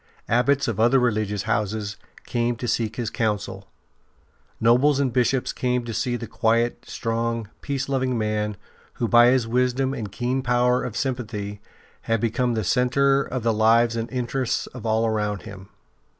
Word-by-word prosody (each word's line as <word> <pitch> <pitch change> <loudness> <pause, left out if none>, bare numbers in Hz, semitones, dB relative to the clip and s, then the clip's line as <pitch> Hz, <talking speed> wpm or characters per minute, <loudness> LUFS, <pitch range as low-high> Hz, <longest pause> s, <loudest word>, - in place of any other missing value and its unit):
Abbots 135 +4 +2
of 110 -3 -2
other 120 +4 +5
religious 105 -5 0
houses 105 -1 -1 0.3
came 120 0 0
to 120 +1 -5
seek 110 -1 -1
his 115 -3 -3
counsel; 105 -4 -2 0.9
nobles 130 +5 +4
and 135 -4 0
Bishops 125 +1 +1
came 125 -1 -1
to 115 - -5
see 120 +3 -1
the 120 - -5
quiet, 115 +1 0
strong, 115 -1 -2
peace 140 -1 -3
loving 130 -2 0
man 105 -1 -1 0.4
who 120 - -2
by 120 +1 +6
his 125 -2 +3
wisdom 125 +2 +1
and 105 -7 -5
keen 125 +4 -1
power 125 0 +2
of 120 -4 -5
sympathy 105 -6 -3 0.5
had 115 0 +2
become 120 +2 0
the 110 - -1
centre 135 +5 +3
of 130 -3 -4
the 115 -1 +2
lives 115 +2 +4
and 115 +1 -3
interests 125 0 -1
of 120 -2 -8
all 110 +1 +2
around 105 -2 -1
him. 100 -3 -10
120 Hz, 165 wpm, -24 LUFS, 110-125 Hz, 0.9 s, by